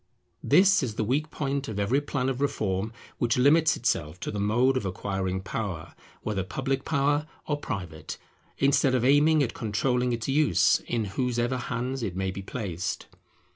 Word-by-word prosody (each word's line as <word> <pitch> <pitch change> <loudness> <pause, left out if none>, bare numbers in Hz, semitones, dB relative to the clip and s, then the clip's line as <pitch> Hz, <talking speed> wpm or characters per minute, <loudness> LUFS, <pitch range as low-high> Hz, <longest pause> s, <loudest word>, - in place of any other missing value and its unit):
This 195 +5 +5
is 120 -6 -3
the 110 - 0
weak 140 +8 0
point 140 -2 -2
of 110 - -5
every 115 +8 +2
plan 140 -2 -2
of 135 0 -2
reform 105 -6 -1 0.3
which 120 0 +1
limits 150 +5 +4
itself 85 -7 -1
to - - -3
the 105 - -4
mode 120 +6 +2
of 130 - 0
acquiring 95 0 -2
power, 95 -5 -5 0.3
whether 105 -3 -1
public 135 +7 -2
power 145 0 +1 0.2
or 145 - -1
private, 90 - -5 0.4
instead 135 -1 +3
of 125 -1 +1
aiming 145 +3 +5
at 120 - -2
controlling 125 +3 0
its 115 -2 -2
use 135 - +3
in 115 -3 -1
whosever 120 +4 -1
hands 125 +2 -3
it 100 -6 -3
may 95 0 -1
be 100 - -6
placed. 95 -4 -4
125 Hz, 170 wpm, -27 LUFS, 100-135 Hz, 0.4 s, This